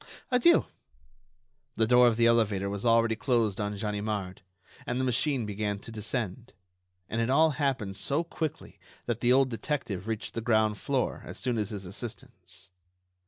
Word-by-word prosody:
Adieu." 250 +8 +5 1.1
The 110 - +2
door 125 +1 +6
of 115 -2 +2
the 115 - +4
elevator 105 -4 +2
was 100 -1 -4
already 115 0 +4
closed 115 -4 0
on 105 0 -3
Ganimard, 105 -2 -3 0.5
and 120 +1 -1
the - - 0
machine 130 0 +1
began 105 0 -2
to 100 - -11
descend; 115 +1 -4 0.5
and 115 - -1
it 115 - 0
all 155 +4 +5
happened 130 -9 -1
so 140 - 0
quickly 160 -2 -5 0.3
that 120 -2 -2
the 120 0 +3
old 130 0 +4
detective 115 -6 -3
reached 110 -2 -3
the 115 - -3
ground 110 -2 +2
floor 135 -3 -1
as - - -9
soon 125 -3 -1
as 105 -2 -2
his 100 -3 -6
assistants. 95 -3 -9
115 Hz, 165 wpm, -29 LUFS, 105-125 Hz, 1.1 s, door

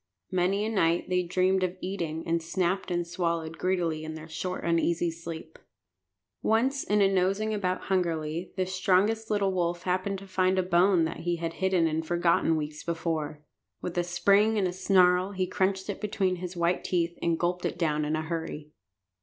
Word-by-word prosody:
Many 190 +3 +1
a - - -1
night 175 -6 +1
they 180 0 +2
dreamed 185 +2 +1
of 185 0 -1
eating, 170 -4 -3
and 165 0 0
snapped 185 +3 -1
and 175 -1 0
swallowed 170 -2 -2
greedily 170 -4 0
in 155 0 -5
their 160 0 -9
short, 180 +3 -4
uneasy 170 0 +1
sleep. 165 -1 -8 0.8
Once, 260 +5 +2
in 210 - +1 0.2
nosing 195 +4 +1
about 185 -3 -1
hungrily, 170 -2 -1
the 185 - +1
strongest 190 +4 +1
little 200 -2 +1
wolf 175 -1 -1
happened 185 +2 -1
to 195 - -10
find 185 -1 +1
a 185 - +3
bone 180 -1 +4
that 165 - -4
he 175 0 -1
had 165 0 -4
hidden 190 -3 +3
and 160 0 0
forgotten 170 -1 +2
weeks 150 -1 -4
before. 160 -3 -3 0.4
With 175 - -4
a 175 - +1
spring 200 +5 +3
and 195 -3 +2
a 180 - -3
snarl 185 0 +3
he 185 -1 0
crunched 190 +1 0
it 200 -1 -5
between 195 -3 0
his 180 0 -6
white 170 +1 +1
teeth 170 -1 0
and 170 -1 +1
gulped 175 +1 -1
it - - -2
down 155 -3 +1
in 150 +1 0
a 155 - -2
hurry. 160 -2 -5
180 Hz, 185 wpm, -28 LUFS, 165-190 Hz, 0.8 s, bone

